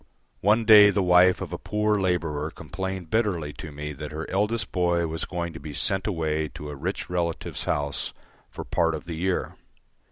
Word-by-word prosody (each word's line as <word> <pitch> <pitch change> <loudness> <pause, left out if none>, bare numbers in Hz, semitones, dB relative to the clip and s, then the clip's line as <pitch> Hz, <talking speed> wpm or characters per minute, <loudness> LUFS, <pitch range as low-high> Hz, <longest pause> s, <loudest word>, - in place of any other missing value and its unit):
One 110 +3 +3
day 105 -2 +9
the 100 -1 +1
wife 90 0 +5
of - - -5
a - - -4
poor 105 0 0
labourer 85 -5 -1
complained 90 +2 -6
bitterly 90 -10 0
to 80 - -8
me 75 +1 -6
that 75 +2 -7
her 80 +1 -5
eldest 105 +4 0
boy 85 -2 +1
was 80 0 -3
going 85 -2 -4
to 80 - -8
be 75 0 -8
sent 95 -1 0
away 80 -5 -1
to 75 - -7
a - - -6
rich 70 - -4
relative's 85 -2 -2
house 70 -1 -1 0.4
for - - -7
part 80 -1 +1
of 75 - -7
the 85 - -6
year. 90 +3 -2
85 Hz, 190 wpm, -26 LUFS, 80-95 Hz, 0.4 s, day